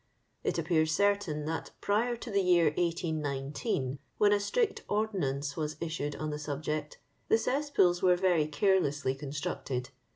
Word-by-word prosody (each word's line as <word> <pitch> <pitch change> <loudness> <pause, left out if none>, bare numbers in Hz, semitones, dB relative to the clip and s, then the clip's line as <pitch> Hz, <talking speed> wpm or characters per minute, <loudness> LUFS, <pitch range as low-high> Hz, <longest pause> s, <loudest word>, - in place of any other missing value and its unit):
It - - 0
appears 160 -3 +2
certain 200 -4 +1
that 160 +1 -3
prior 225 +4 +1
to 235 0 -8
the 200 -1 +3
year 175 -4 +4
1819 150 - -1 0.2
(when 205 0 +5
a 205 - +3
strict 430 - 0
ordonnance 145 -10 -1
was 155 -1 -2
issued 155 -3 -3
on 155 0 -3
the 150 - -4
subject) 150 0 -3 0.3
the 225 - +5
cesspools 250 -8 +2
were 180 -1 +5
very 175 -4 +2
carelessly 155 -5 +2
constructed. 135 -2 -4
160 Hz, 140 wpm, -31 LUFS, 150-200 Hz, 0.3 s, when